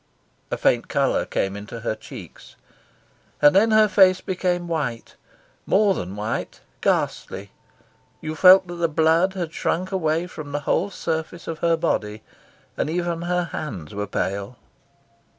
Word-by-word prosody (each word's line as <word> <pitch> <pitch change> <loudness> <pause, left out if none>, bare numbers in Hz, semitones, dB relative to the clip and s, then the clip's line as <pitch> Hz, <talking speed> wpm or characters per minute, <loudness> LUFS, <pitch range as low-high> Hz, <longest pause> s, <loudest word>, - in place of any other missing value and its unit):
A - - -2
faint - - +2
colour - - +1
came 95 0 -1
into 105 +3 -8
her 115 - -1
cheeks, - - -12 0.8
and 145 +3 +6
then 215 +4 +5
her 215 0 +5
face 190 -2 +5
became 180 -2 -2
white 145 -9 -3 0.5
more 205 0 +4
than 95 - -5
white, 105 +2 -4 0.2
ghastly; 100 0 -1 0.7
you 155 0 -5
felt 185 +2 +8
that 175 -1 -8
the 170 -1 +1
blood 165 +4 +3
had 175 -4 -4
shrunk 185 +3 -1
away 165 -2 0
from 155 -5 -9
the 145 - -1
whole 175 +6 0
surface 165 -2 -4
of 165 -1 -4
her 170 -1 +2
body; 105 -8 -2 0.5
and - - -1
even 170 0 -2
her 180 +1 0
hands 95 - -6
were 105 0 -3
pale. 100 +4 -3
165 Hz, 150 wpm, -23 LUFS, 120-180 Hz, 0.8 s, felt